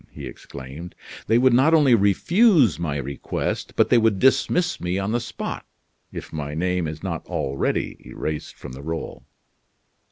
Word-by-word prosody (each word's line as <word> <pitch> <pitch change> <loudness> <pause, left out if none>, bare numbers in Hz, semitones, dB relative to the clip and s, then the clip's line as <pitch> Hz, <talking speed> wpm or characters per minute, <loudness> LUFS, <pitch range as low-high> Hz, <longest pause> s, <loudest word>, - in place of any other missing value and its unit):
he - - -9
exclaimed. 70 +6 -9 0.3
"They 115 - +4
would 130 0 +4
not 140 +7 +5
only 145 -5 +5
refuse 125 - +4
my 75 -4 -2
request, 70 0 -4
but - - +3
they 120 - +6
would 110 -3 +2
dismiss 170 - +2
me 90 +1 -1
on 100 +2 -1
the 120 - +1
spot, 120 0 -5 0.5
if - - -8
my 75 -1 -4
name 90 0 0
is 75 0 -7
not - - -3
already 70 0 -2
erased 75 -1 -5
from - - -10
the 65 +2 -9
roll." 80 +2 -5
95 Hz, 160 wpm, -23 LUFS, 75-120 Hz, 0.5 s, they